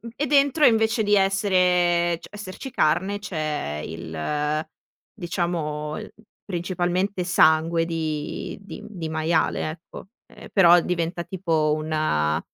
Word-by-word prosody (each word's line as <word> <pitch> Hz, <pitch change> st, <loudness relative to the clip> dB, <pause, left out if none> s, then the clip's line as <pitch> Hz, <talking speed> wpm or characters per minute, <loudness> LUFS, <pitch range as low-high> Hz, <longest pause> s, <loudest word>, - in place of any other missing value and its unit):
e 295 Hz, -, -1 dB
dentro, 285 Hz, +2 st, +4 dB
invece 225 Hz, 0 st, +3 dB
di 205 Hz, 0 st, +3 dB
essere 180 Hz, -3 st, +2 dB
cioè -, -, -12 dB
esserci 205 Hz, +5 st, -8 dB
carne, 175 Hz, +4 st, +1 dB
c'è 155 Hz, -, -3 dB
il, 145 Hz, -, -3 dB, 0.5 s
diciamo 165 Hz, -5 st, -3 dB
il 215 Hz, -, -10 dB, 0.3 s
principalmente 180 Hz, +1 st, -1 dB
sangue 165 Hz, -1 st, +3 dB
di 160 Hz, -3 st, -4 dB
di 200 Hz, -, -10 dB
di 175 Hz, -7 st, -6 dB
maiale, 160 Hz, 0 st, 0 dB
ecco, 170 Hz, +3 st, -12 dB, 0.2 s
ehm, -, -, -13 dB
però 175 Hz, -3 st, +7 dB
diventa 170 Hz, 0 st, -2 dB
tipo 165 Hz, -5 st, 0 dB
una, 155 Hz, -, 0 dB
170 Hz, 115 wpm, -24 LUFS, 155-190 Hz, 0.5 s, però